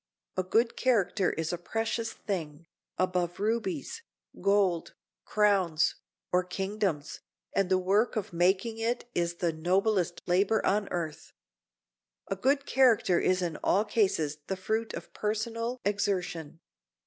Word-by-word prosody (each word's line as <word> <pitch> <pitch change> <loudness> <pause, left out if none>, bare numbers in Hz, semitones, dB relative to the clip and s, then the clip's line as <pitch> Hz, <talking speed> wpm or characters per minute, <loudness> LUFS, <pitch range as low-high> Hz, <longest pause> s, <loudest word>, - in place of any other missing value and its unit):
A 185 - +1
good 225 +6 +1
character 215 -6 +2
is 160 +1 -2
a 175 - -3
precious 225 +4 -2
thing, 165 -5 -5 0.3
above 180 -1 0
rubies, 275 - -2 0.4
gold, 195 -4 +2 0.3
crowns, 190 -6 +3 0.4
or 180 0 +3
kingdoms, 190 -4 -2 0.3
and 195 -2 +1
the 185 - +4
work 200 +7 +2
of 210 -5 -3
making 190 +6 +2
it 235 +2 -1
is 170 0 0
the 170 -1 0
noblest 180 +2 +1
labor 195 +5 +2
on 200 +1 +1
earth. 160 -3 -4 1.0
A 195 - 0
good 275 +8 +1
character 235 -11 +4
is 185 0 +2
in 165 -3 -2
all 205 +3 +3
cases 190 -9 +1
the 190 - -2
fruit 220 +4 -2
of - - -9
personal 230 +3 -2
exertion. 185 -6 -1
195 Hz, 130 wpm, -29 LUFS, 175-220 Hz, 1.0 s, the